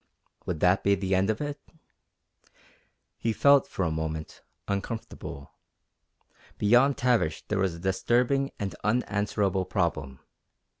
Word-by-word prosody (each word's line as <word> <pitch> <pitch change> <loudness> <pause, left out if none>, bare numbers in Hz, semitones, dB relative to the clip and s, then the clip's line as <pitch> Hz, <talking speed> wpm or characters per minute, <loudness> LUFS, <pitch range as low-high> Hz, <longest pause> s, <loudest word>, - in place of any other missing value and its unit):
Would 80 -4 -3
that 90 +2 +3
be 100 0 +4
the 95 0 -2
end 95 +2 +2
of 110 +4 -1
it? 145 0 -4 1.6
He 115 - 0
felt, 140 +5 +5
for 95 - -2
a 80 - 0
moment, 80 0 -4 0.3
uncomfortable. 100 - -5 1.1
Beyond 125 +6 +4
Tavish 115 -11 +1
there 105 - 0
was 95 -3 0
a - - -10
disturbing 120 +9 +1
and 100 -1 -3
unanswerable 100 -3 0
problem. 80 -8 -2
100 Hz, 120 wpm, -27 LUFS, 90-120 Hz, 1.6 s, felt